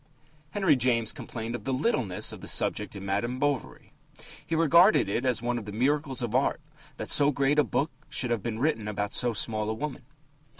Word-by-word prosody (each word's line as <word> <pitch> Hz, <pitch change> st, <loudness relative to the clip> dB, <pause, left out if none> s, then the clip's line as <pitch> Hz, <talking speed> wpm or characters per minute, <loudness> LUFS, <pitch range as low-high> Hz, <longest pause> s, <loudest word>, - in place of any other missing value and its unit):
Henry 190 Hz, -6 st, +2 dB
James 120 Hz, -3 st, +1 dB
complained 115 Hz, 0 st, -6 dB
of 120 Hz, -, -5 dB
the 135 Hz, -, -2 dB
littleness 130 Hz, -, 0 dB
of -, -, -10 dB
the -, -, -7 dB
subject 105 Hz, 0 st, +1 dB
in 100 Hz, 0 st, -7 dB
Madame 105 Hz, +6 st, -1 dB
Bovary. 145 Hz, -2 st, -3 dB, 0.5 s
He 165 Hz, -, -3 dB
regarded 170 Hz, -, +5 dB
it 115 Hz, +6 st, -1 dB
as 125 Hz, -3 st, +1 dB
one 120 Hz, 0 st, -1 dB
of 110 Hz, -, -10 dB
the 105 Hz, -, -6 dB
miracles 135 Hz, +3 st, 0 dB
of 115 Hz, -2 st, -3 dB
art 130 Hz, +5 st, +1 dB, 0.4 s
that -, -, -5 dB
so 145 Hz, -1 st, +5 dB
great 140 Hz, +1 st, +1 dB
a -, -, +6 dB
book 150 Hz, +3 st, -1 dB, 0.2 s
should 125 Hz, -2 st, -1 dB
have 115 Hz, -3 st, 0 dB
been 115 Hz, 0 st, -4 dB
written 115 Hz, -5 st, 0 dB
about 105 Hz, -1 st, -3 dB
so 120 Hz, -1 st, +1 dB
small 110 Hz, 0 st, 0 dB
a 110 Hz, -, -2 dB
woman. 150 Hz, +4 st, -5 dB
125 Hz, 205 wpm, -27 LUFS, 110-145 Hz, 0.5 s, a